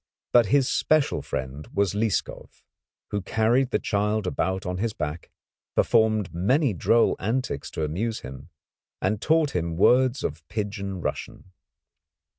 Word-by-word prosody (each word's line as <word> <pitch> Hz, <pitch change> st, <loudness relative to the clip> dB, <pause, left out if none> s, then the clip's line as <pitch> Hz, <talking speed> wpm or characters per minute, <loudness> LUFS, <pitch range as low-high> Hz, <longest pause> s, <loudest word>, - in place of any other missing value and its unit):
But 120 Hz, -3 st, +6 dB
his 135 Hz, +1 st, +3 dB
special 155 Hz, 0 st, +2 dB
friend 65 Hz, +3 st, -5 dB
was 100 Hz, -1 st, +2 dB
Lieskov, 105 Hz, 0 st, -2 dB, 0.5 s
who 105 Hz, -, -1 dB
carried 115 Hz, +6 st, +1 dB
the -, -, +1 dB
child 105 Hz, 0 st, -1 dB
about 95 Hz, +1 st, -1 dB
on 90 Hz, 0 st, -3 dB
his 110 Hz, +1 st, -1 dB
back, 75 Hz, -1 st, -5 dB, 0.5 s
performed 110 Hz, -4 st, +2 dB
many 125 Hz, -, +2 dB
droll 115 Hz, +5 st, +3 dB
antics 115 Hz, -, -2 dB
to 80 Hz, -, -4 dB
amuse 105 Hz, +10 st, -2 dB
him, 65 Hz, 0 st, -10 dB, 0.5 s
and 100 Hz, +2 st, -1 dB
taught 155 Hz, -4 st, +2 dB
him 85 Hz, -1 st, -2 dB
words 130 Hz, +6 st, +4 dB
of 75 Hz, +2 st, -3 dB
pidgin 100 Hz, -1 st, -4 dB
Russian. 95 Hz, -, -5 dB
105 Hz, 135 wpm, -25 LUFS, 90-120 Hz, 0.5 s, But